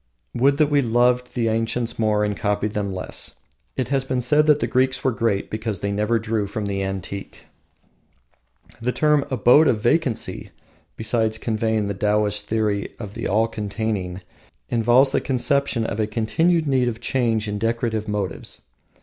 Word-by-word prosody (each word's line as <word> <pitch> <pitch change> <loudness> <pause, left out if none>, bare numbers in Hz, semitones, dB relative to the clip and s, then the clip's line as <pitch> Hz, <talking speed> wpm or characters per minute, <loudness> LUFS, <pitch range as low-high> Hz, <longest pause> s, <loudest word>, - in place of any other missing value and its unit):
Would 135 +3 +3
that 150 -1 +2
we 145 -1 +4
loved 125 +1 +1
the 120 -2 +1
ancients 115 +1 -1
more 105 -1 +2
and 105 -1 -2
copied 105 +1 -1
them 100 -2 -2
less! 90 -1 -2 0.4
It - - -1
has 135 -1 +1
been 130 -1 -2
said 150 +5 +3
that 150 -1 +5
the - - 0
Greeks 130 +1 +1
were 130 - +2
great 115 -4 -1
because 110 -2 -3
they 100 - -1
never 105 +3 +1
drew 110 -2 -1
from 105 +1 -4
the 100 -1 -2
antique. 95 0 -5 1.4
The 125 +2 0
term, 150 +1 +2
Abode 130 +5 +5
of 110 - +2
Vacancy, 120 +2 -1 0.5
besides 110 -1 0
conveying 110 -1 -1
the 100 - -2
Taoist 105 +1 0
theory 105 -2 -1
of 105 -4 -8
the - - -4
all 110 +3 +2
containing, 105 -4 -3 0.5
involves 120 +4 +4
the - - +1
conception 130 -1 0
of 110 - -3
a 110 - +1
continued 160 +10 +1
need 130 -3 +2
of 115 -2 -3
change 115 -3 0
in 105 0 -3
decorative 115 -1 -1
motives. 100 -6 -4
115 Hz, 165 wpm, -22 LUFS, 105-125 Hz, 1.4 s, that